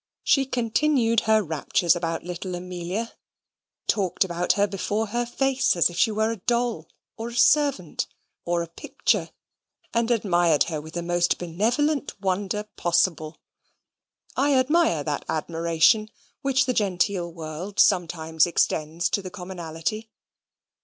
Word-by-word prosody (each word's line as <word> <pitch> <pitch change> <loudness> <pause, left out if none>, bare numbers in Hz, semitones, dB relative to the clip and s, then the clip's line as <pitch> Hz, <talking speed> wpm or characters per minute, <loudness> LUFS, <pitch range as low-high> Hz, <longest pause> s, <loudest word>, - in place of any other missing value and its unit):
She 270 -2 +3
continued 240 -1 +2
her 220 -1 +5
raptures 165 +1 +1
about 165 -1 -3
little 180 +1 -5
Amelia, 180 +5 -4 0.7
talked 195 -3 +1
about 175 -1 0
her 205 - +2
before 205 +2 -2
her 240 +2 -1
face 270 -1 +1
as 175 0 +3
if - - -10
she 230 - +4
were 220 +1 0
a 230 - -4
doll, 235 -5 -1 0.3
or 225 - -4
a 235 - -7
servant, 275 - +2 0.4
or 170 0 0
a - - -7
picture, 165 - -1 0.6
and 235 0 +1
admired 175 -9 +3
her 155 -3 -4
with 160 +2 -11
the 175 - -2
most 175 0 +1
benevolent 235 - -1
wonder 195 +2 -1
possible. 170 -2 +1 1.0
I 280 +1 +2
admire 260 - +2
that 145 -2 -3
admiration 170 +7 +2 0.3
which 265 -1 +2
the 255 - 0
genteel 185 -4 0
world 165 +4 -7
sometimes 160 -3 +3
extends 165 0 0
to 200 - +1
the 185 - -7
commonalty. 180 +3 -5
185 Hz, 135 wpm, -25 LUFS, 170-230 Hz, 1.0 s, her